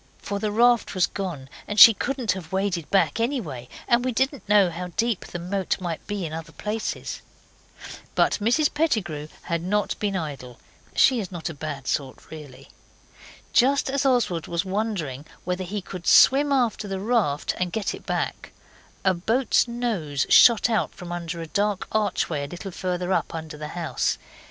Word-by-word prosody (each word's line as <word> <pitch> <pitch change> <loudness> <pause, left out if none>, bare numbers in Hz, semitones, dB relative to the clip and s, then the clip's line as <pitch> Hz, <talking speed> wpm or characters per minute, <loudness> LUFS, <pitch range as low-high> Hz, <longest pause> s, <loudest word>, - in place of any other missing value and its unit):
For 200 0 -4
the 215 0 -1
raft 235 0 +3
was 185 - +4
gone, 170 -9 -5 0.2
and 210 0 -1
she 230 - +12
couldn't 250 -2 -1
have 170 -3 -6
waded 190 -4 -1
back 200 +3 +2
anyway, 195 - -3 0.2
and 240 0 +3
we 255 - 0
didn't 265 0 -1
know 200 -4 +5
how 180 +2 -5
deep 230 -3 0
the - - -6
moat 185 +2 -2
might 175 -3 -5
be 205 -3 -3
in 155 - -6
other 165 0 -7
places. 215 +1 -4 0.9
But - - +2
Mrs 245 +8 +2
Pettigrew 215 - -1 0.2
had 170 -1 -2
not 205 +4 -1
been 205 -2 -1
idle. 140 -8 -5 0.4
She 255 -3 +5
is 195 -4 -5
not 175 -1 -4
a - - -6
bad 145 -3 -6
sort 135 -2 -3
really. 140 -4 -11 0.8
Just 270 +2 +3
as 275 0 0
Oswald 240 - +1
was 170 +2 -2
wondering 190 - -3 0.2
whether 180 +1 -2
he 195 +2 -4
could 180 -2 -8
swim 285 +2 +6
after 240 -6 +1
the 195 -1 -3
raft 205 -9 0
and 180 -1 -1
get 215 +1 -2
it - - -9
back, - - -3 0.5
a 190 - +4
boat's 225 +9 +1
nose 215 - -2
shot 235 -2 +7
out 225 -3 -1
from 180 -2 -8
under 170 -1 -4
a - - -5
dark 205 +2 -1
archway 185 -8 0
a - - -9
little 185 +4 -7
further 180 0 -2
up - - -1
under 160 -1 -6
the 150 0 -6
house. 170 -2 -1
190 Hz, 175 wpm, -24 LUFS, 165-225 Hz, 0.9 s, she